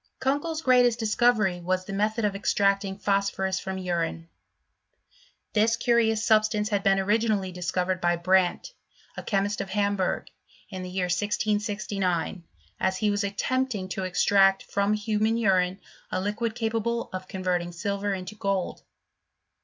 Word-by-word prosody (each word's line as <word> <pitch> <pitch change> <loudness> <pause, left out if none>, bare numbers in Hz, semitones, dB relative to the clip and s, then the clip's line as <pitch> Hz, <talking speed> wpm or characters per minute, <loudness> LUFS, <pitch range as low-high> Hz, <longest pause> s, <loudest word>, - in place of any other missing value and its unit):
Kunkel's 290 +4 -1
greatest 245 -2 +4
discovery 215 -5 +2
was, 185 +1 -1
the 195 - -6
method 215 +2 0
of 200 -1 0
extracting 200 -1 +1
phosphonis 195 -1 0
from 190 -1 -4
urine. 170 -2 -3 1.2
This 225 +1 +3
curiouB 235 -2 +2
substance 215 -1 +2
had 205 -2 0
been 195 -1 +3
originally 205 -1 +1
discovered 180 +1 -2
by 175 0 +2
Brandt, 185 - +1 0.4
achemist, 200 0 -1
of 195 - -6
Hamburg, 200 -1 0 0.4
in 190 -1 -5
the 185 - -6
year 185 0 -1
1669, 205 -2 -1 0.4
as 190 0 0
he 210 +2 +1
was 205 0 0
attempting 210 0 -1
to 190 - -3
extract 195 +1 +3
from 200 +1 0
human 215 +1 0
nrine 190 -5 +2 0.3
a 185 - 0
liquid 220 +4 -2
capable 230 0 -2
of 185 0 -5
converting 180 -2 -2
silver 200 +3 -2
into 185 +1 -4
gold. 195 -3 -2
200 Hz, 135 wpm, -26 LUFS, 185-215 Hz, 1.2 s, greatest